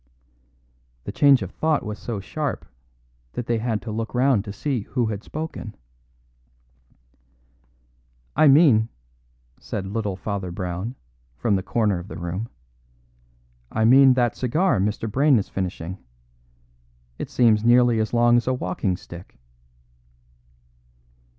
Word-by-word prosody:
The - - -5
change 140 -6 +4
of 95 - -7
thought 155 -1 0
was 105 0 -5
so 115 -4 -4
sharp 145 +8 -4 0.7
that 120 - -4
they 120 -1 0
had 110 -2 -2
to 110 - -5
look 115 +2 -4
round 125 -4 +3
to 100 - -6
see 125 +4 -2
who 120 +4 -2
had 105 -2 -3
spoken. 155 -9 -6 2.6
"I 155 - +5
mean," 135 -7 +5 0.7
said 95 - -5
little 105 -1 -3
Father 100 -1 -4
Brown, 90 +6 -4 0.4
from 105 +3 +1
the 95 - 0
corner 105 -2 0
of 90 - -9
the - - -8
room, 90 +6 -4 1.2
"I 110 0 +1
mean 130 +2 +7
that 120 -3 +1
cigar 155 - +1
Mr. 105 +3 -1
Brayne 135 +5 +3
is 100 - -2
finishing. 95 -1 -4 1.2
It - - -5
seems 110 -3 +3
nearly 120 -1 +4
as 110 -1 -1
long 120 0 +4
as 120 - -1
a 130 - +1
walking 90 -3 -2
stick." 85 -6 -12
110 Hz, 130 wpm, -23 LUFS, 100-125 Hz, 2.6 s, mean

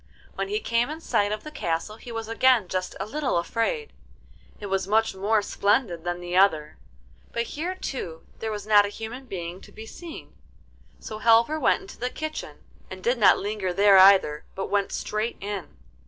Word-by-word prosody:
When - - -3
he 420 +2 -1
came 235 - 0
in 310 +1 -5
sight 205 -10 0
of 215 0 -3
the 305 - -8
castle 170 - -3
he 240 - -10
was 225 -1 -4
again 230 -2 +3
just 185 0 -3
a - - -2
little 260 - -1
afraid. 235 - -1 0.7
It 205 - -7
was 195 -1 -1
much 220 +2 +2
more 205 +2 +1
splendid 200 -5 0
than 175 0 -3
the 175 0 -5
other, 160 -6 +3 0.5
but 235 - -1
here 335 +9 -4
too 175 - -6
there 220 - -3
was 205 -1 -5
not 210 -1 +6
a 205 - -2
human 225 +5 -7
being 180 -2 -6
to - - -15
be 220 - -10
seen. 330 +8 -10 0.7
So 215 - -7
Halvor 230 +7 +4
went - - +2
into 390 - -12
the 250 - -1
kitchen, 310 +3 -6 0.3
and 185 0 -9
did 245 +1 +1
not 205 - +6
linger 205 -3 -2
there 195 +1 +6
either, 185 -6 +6
but 195 - -4
went 200 -1 +1
straight 215 +2 -2
in. 200 -2 -6
215 Hz, 190 wpm, -25 LUFS, 190-240 Hz, 0.7 s, not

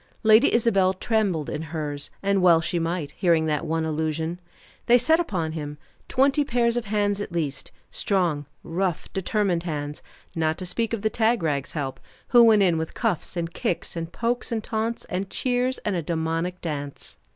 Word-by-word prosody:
Lady 220 +4 +6
Isabel 195 -5 +3
trembled 190 -7 0
in 150 - -3
hers; 150 -3 -4
and 200 -1 +2
well 170 -2 +6
she 170 +1 -1
might, 165 -3 -2
hearing 165 -2 +2
that 155 +1 -1
one 160 0 0
allusion. 160 +2 -2 0.5
They 240 - +7
set 320 +7 +4
upon 180 - -1
him, 150 -2 -5 0.3
twenty 275 +2 +3
pairs 235 -3 +1
of 240 -2 -1
hands 205 -1 0
at 205 - -5
least, 145 -5 -3 0.2
strong, 170 -8 0 0.2
rough, 175 0 -2
determined 190 -2 0
hands; 150 -3 -4 0.3
not 160 -1 0
to 185 - -5
speak 225 +6 -2
of 220 -3 -3
the 220 - +1
tagrag's 170 - 0
help, 140 -4 -3 0.3
who 240 -1 +7
went 220 -3 +6
in 170 -4 +3
with 160 - -5
cuffs, 175 - -1
and 170 0 -3
kicks, 175 - -2
and 165 0 -4
pokes, 240 +4 -1
and 225 -2 -1
taunts, 225 +1 -2
and 190 +2 -3
cheers, 250 +1 0
and 210 -3 0
a 170 - 0
demoniac 165 +2 -2
dance. 145 -4 -6
180 Hz, 175 wpm, -25 LUFS, 160-220 Hz, 0.5 s, They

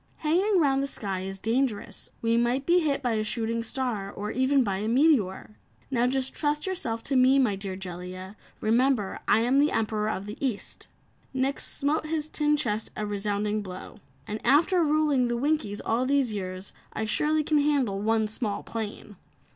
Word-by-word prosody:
"Hanging 365 +6 +2
'round 275 -4 +3
the 275 - -1
sky 195 -8 -3
is 195 +1 -6
dangerous. 230 0 -1
We 230 0 +2
might 240 +3 +1
be 350 +1 +4
hit 295 -5 0
by 245 - +1
a 215 -1 0
shooting 230 +1 -1
star 230 -5 -2
or 210 +1 -5
even 260 +2 +3
by 195 -4 -1
a 210 +2 -3
meteor. 230 - +2 0.3
Now, 245 -1 +2
just 265 0 -1
trust 295 0 -1
yourself 250 -12 -2
to 275 - -1
me, 260 +1 +5
my 245 -7 +3
dear 195 -1 -4
Jellia. 185 +1 -7 0.3
Remember 230 -2 +1
I 225 - +4
am 250 +4 +3
the 295 +1 +3
Emperor 215 -1 0
of 200 -2 -3
the 210 +6 -8
East!" 245 -7 -4 0.5
Nick 265 +2 0
smote 300 +2 -1
his 310 -1 -2
tin 300 -1 +1
chest 215 -5 -1
a 215 - -2
resounding 205 +1 -1
blow. 185 -2 -9 0.3
"And 215 +1 -5
after 325 +7 +4
ruling 300 -4 +2
the 240 0 -1
Winkies 270 -6 -1
all 240 +3 0
these 275 -5 +2
years, 185 -1 -5 0.2
I 220 - -3
surely 300 +7 +1
can 300 0 +2
handle 275 -9 +1
one 220 0 +2
small 215 -1 -3
plane!" 215 -2 -6
235 Hz, 180 wpm, -27 LUFS, 210-280 Hz, 0.5 s, me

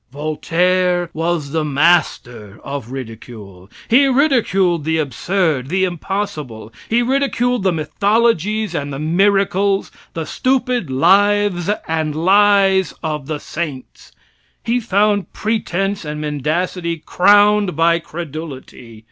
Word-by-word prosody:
Voltaire 175 +4 0
was 165 -3 -2
the 160 0 -1
master 135 - 0
of 140 -4 -6
ridicule. 110 -7 -10 0.2
He 275 +4 +4
ridiculed 230 - +2
the 160 +1 0
absurd, 155 - -1
the 190 +3 +1
impossible. 170 - -4 0.2
He 235 +2 +2
ridiculed 250 -2 0
the 190 -1 +1
mythologies 210 +5 0
and 145 -3 -3
the 135 - -5
miracles, 195 +4 +1 0.2
the 165 -1 -3
stupid 250 - -1
lives 195 +5 +2 0.2
and 160 -2 -2
lies 195 +2 +3
of 150 -3 -4
the 155 -1 -3
saints. 150 -6 -7 0.5
He 235 +2 0
found 205 -2 0
pretense 200 -3 -2
and 150 0 -5
mendacity 165 +4 -2
crowned 205 +3 +3
by 165 +1 +3
credulity. 150 -8 -9
175 Hz, 110 wpm, -18 LUFS, 150-205 Hz, 0.5 s, He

